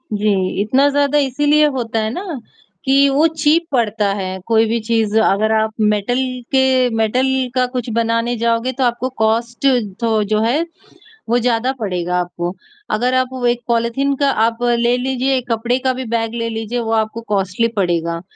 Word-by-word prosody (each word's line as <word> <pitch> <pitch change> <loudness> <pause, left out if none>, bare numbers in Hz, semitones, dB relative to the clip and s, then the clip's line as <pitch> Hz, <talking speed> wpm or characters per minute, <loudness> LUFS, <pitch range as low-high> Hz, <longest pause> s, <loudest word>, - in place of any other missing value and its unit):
जी, 200 -2 0
इतना 260 +7 +3
ज़्यादा 285 0 +1
इसीलिए 290 +2 +3
होता 230 -3 -2
है 215 - -1
ना, 355 -5 -5 0.5
कि 275 +1 +4
वो 290 +4 +3
चीप 320 +1 +1
पड़ता 220 -5 +1
है, 190 0 -4
कोई 225 -1 +3
भी 230 +1 0
चीज़ 220 -2 +1
अगर 215 +1 +2
आप 220 0 +1
मेटल 210 +3 +1 0.3
के 265 -1 +4 0.3
मेटल 225 +4 +1 0.3
का 255 -1 +3
कुछ 250 -2 -3
बनाने 230 +1 0
जाओगे 230 +2 0
तो 260 +1 -2
आपको 245 +1 0
कॉस्ट 230 +3 0 0.4
थो 220 -2 +2
जो 215 +1 0
है, 255 +9 +1 0.6
वो 240 - +3
ज़्यादा 240 +1 +1
पड़ेगा 180 -4 -2
आपको। 175 0 -3 0.4
अगर 245 +4 +1
आप 255 0 +2
वो 255 -1 -3
एक 240 0 0
पॉलिथीन 235 +4 0
का 280 +1 +1 0.2
आप 230 0 -1
ले 240 0 +2
लीजिए, 265 +1 0
एक 250 -1 -6
कपड़े 235 +2 0
का 260 0 0
भी 255 0 -5
बैग 225 0 -1
ले 230 -1 -2
लीजिए, 225 +2 -3
वो 225 -1 -3
आपको 220 +1 -1
कॉस्टली 200 +2 0
पड़ेगा। 170 -3 -1
235 Hz, 175 wpm, -18 LUFS, 220-255 Hz, 0.6 s, कि